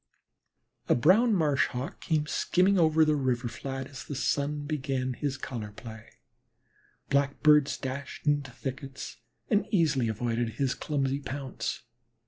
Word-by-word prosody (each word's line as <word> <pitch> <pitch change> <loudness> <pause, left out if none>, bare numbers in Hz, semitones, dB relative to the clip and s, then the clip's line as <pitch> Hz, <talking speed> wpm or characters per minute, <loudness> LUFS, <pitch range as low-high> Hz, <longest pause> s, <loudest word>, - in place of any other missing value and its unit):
A - - +5
brown 205 - +5
Marsh 150 -6 +2
Hawk 125 +2 -5
came 155 -3 +1
skimming 185 +5 +2
over 160 -1 +5
the 155 0 +3
river 130 -3 0
flat 135 +2 -5
as 135 -1 -9
the 145 - -6
sun 145 +2 -1
began 135 -3 -2
his 135 +1 -3
color 115 -6 -5
play. 110 0 -10 1.0
Blackbirds 140 +1 +4
dashed 135 +1 -6
into 145 -2 +1
thickets, 135 +1 -6 0.3
and 205 0 +3
easily 150 - +2
avoided 115 +1 -1
his 130 +2 0
clumsy 140 -2 -1
pounce. 135 -1 -4
140 Hz, 130 wpm, -29 LUFS, 130-150 Hz, 1.0 s, A